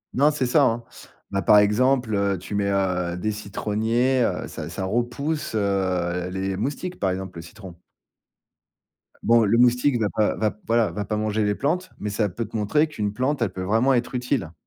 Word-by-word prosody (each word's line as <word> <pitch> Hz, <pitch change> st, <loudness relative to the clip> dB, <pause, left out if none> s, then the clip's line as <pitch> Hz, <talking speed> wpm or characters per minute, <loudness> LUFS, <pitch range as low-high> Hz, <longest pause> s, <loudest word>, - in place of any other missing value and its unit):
Non, 145 Hz, +3 st, +5 dB
c'est 145 Hz, -3 st, -1 dB
ça, 140 Hz, +4 st, +4 dB
hein. 120 Hz, -2 st, +1 dB, 0.5 s
Bah, 100 Hz, 0 st, 0 dB
par 105 Hz, -, +6 dB
exemple, 115 Hz, +3 st, +3 dB
heu, 100 Hz, -1 st, +1 dB
tu 90 Hz, +4 st, -8 dB
mets, 100 Hz, -1 st, 0 dB
heu, 90 Hz, -3 st, 0 dB
des 110 Hz, +4 st, -1 dB
citronniers, 110 Hz, +5 st, 0 dB
heu, -, -, -1 dB
ça 75 Hz, -, -7 dB
ça 95 Hz, +3 st, -4 dB
repousse, 120 Hz, +7 st, -2 dB
heu, 90 Hz, -3 st, 0 dB
les 95 Hz, +1 st, -2 dB
moustiques, 145 Hz, -, -4 dB
par 95 Hz, -, +1 dB
exemple, 95 Hz, -2 st, -5 dB
le -, -, -6 dB
citron. 95 Hz, +2 st, -11 dB, 1.5 s
Bon 115 Hz, -1 st, +5 dB
le 110 Hz, +3 st, +3 dB
moustique 125 Hz, +2 st, +4 dB
va 105 Hz, -, +1 dB
pas 105 Hz, 0 st, +1 dB
va 110 Hz, -1 st, 0 dB
p -, -, -19 dB
voilà, 115 Hz, -1 st, +2 dB
va 105 Hz, -1 st, -4 dB
pas 105 Hz, -, -2 dB
manger 110 Hz, 0 st, 0 dB
les 105 Hz, 0 st, +1 dB
plantes, 180 Hz, -, -1 dB
mais 105 Hz, -, -4 dB
ça 105 Hz, +1 st, 0 dB
peut 100 Hz, +5 st, -4 dB
te 110 Hz, +2 st, -6 dB
montrer 150 Hz, +10 st, +2 dB
qu'une 105 Hz, -9 st, -3 dB
plante, 130 Hz, +5 st, -1 dB
elle 115 Hz, -, 0 dB
peut 95 Hz, -, -5 dB
vraiment 115 Hz, +8 st, +2 dB
être 125 Hz, +1 st, -1 dB
utile. 125 Hz, -, -2 dB
105 Hz, 200 wpm, -24 LUFS, 100-125 Hz, 1.5 s, par